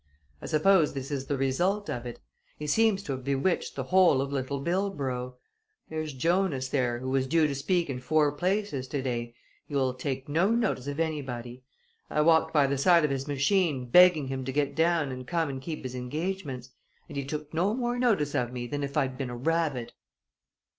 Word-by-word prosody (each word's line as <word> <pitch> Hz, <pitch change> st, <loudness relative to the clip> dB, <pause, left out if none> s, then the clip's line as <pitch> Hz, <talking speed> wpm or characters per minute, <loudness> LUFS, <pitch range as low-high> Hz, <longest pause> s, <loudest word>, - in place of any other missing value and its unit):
"I -, -, -6 dB
suppose 165 Hz, +1 st, +3 dB
this 135 Hz, +1 st, -5 dB
is 135 Hz, -2 st, -3 dB
the 140 Hz, -, -1 dB
result 180 Hz, +10 st, 0 dB
of 120 Hz, 0 st, -4 dB
it. 120 Hz, -, -8 dB, 0.4 s
He 150 Hz, -, -6 dB
seems 205 Hz, +5 st, +2 dB
to 145 Hz, -, -5 dB
have 130 Hz, -1 st, -4 dB
bewitched 140 Hz, +6 st, 0 dB
the -, -, -3 dB
whole 185 Hz, -7 st, +4 dB
of 140 Hz, +1 st, -2 dB
Little 140 Hz, +1 st, -2 dB
Bildborough. 140 Hz, -8 st, -2 dB, 0.5 s
There's 155 Hz, -2 st, -4 dB
Jonas 160 Hz, -2 st, 0 dB
there, 125 Hz, -4 st, 0 dB
who 130 Hz, +2 st, -4 dB
was 135 Hz, 0 st, +1 dB
due 160 Hz, +3 st, +3 dB
to 145 Hz, -, 0 dB
speak 170 Hz, +5 st, 0 dB
in 130 Hz, -3 st, -4 dB
four 150 Hz, +3 st, +2 dB
places 180 Hz, -3 st, -1 dB
today 120 Hz, -4 st, -3 dB, 0.3 s
he 145 Hz, -, -6 dB
will 130 Hz, -2 st, +1 dB
take 130 Hz, +1 st, -4 dB
no 165 Hz, +7 st, +2 dB
notice 220 Hz, -, 0 dB
of 145 Hz, +2 st, -4 dB
anybody. 130 Hz, -6 st, -4 dB, 0.4 s
I 150 Hz, -, +1 dB
walked 160 Hz, +1 st, +4 dB
by 145 Hz, -3 st, +4 dB
the 135 Hz, 0 st, -1 dB
side 170 Hz, +1 st, +5 dB
of 150 Hz, -, -1 dB
his 135 Hz, +1 st, -3 dB
machine, 145 Hz, -3 st, +1 dB
begging 180 Hz, -3 st, +7 dB
him 130 Hz, 0 st, -3 dB
to 135 Hz, -, -2 dB
get 140 Hz, +1 st, 0 dB
down 160 Hz, -3 st, +2 dB
and 130 Hz, 0 st, -7 dB
come 165 Hz, -3 st, 0 dB
and 135 Hz, -1 st, -5 dB
keep 155 Hz, +2 st, -6 dB
his 130 Hz, -1 st, -5 dB
engagements, 135 Hz, 0 st, -4 dB, 0.4 s
and -, -, -10 dB
he 140 Hz, -, -2 dB
took 150 Hz, +2 st, -6 dB
no 185 Hz, +7 st, +1 dB
more 245 Hz, -1 st, -1 dB
notice 205 Hz, -, +2 dB
of 120 Hz, -1 st, 0 dB
me 125 Hz, -1 st, -4 dB
than 145 Hz, +3 st, -3 dB
if 140 Hz, +1 st, -4 dB
I'd 130 Hz, -2 st, 0 dB
been 135 Hz, -3 st, -3 dB
a 120 Hz, -, -6 dB
rabbit! 150 Hz, -3 st, -1 dB
145 Hz, 200 wpm, -28 LUFS, 130-170 Hz, 0.5 s, begging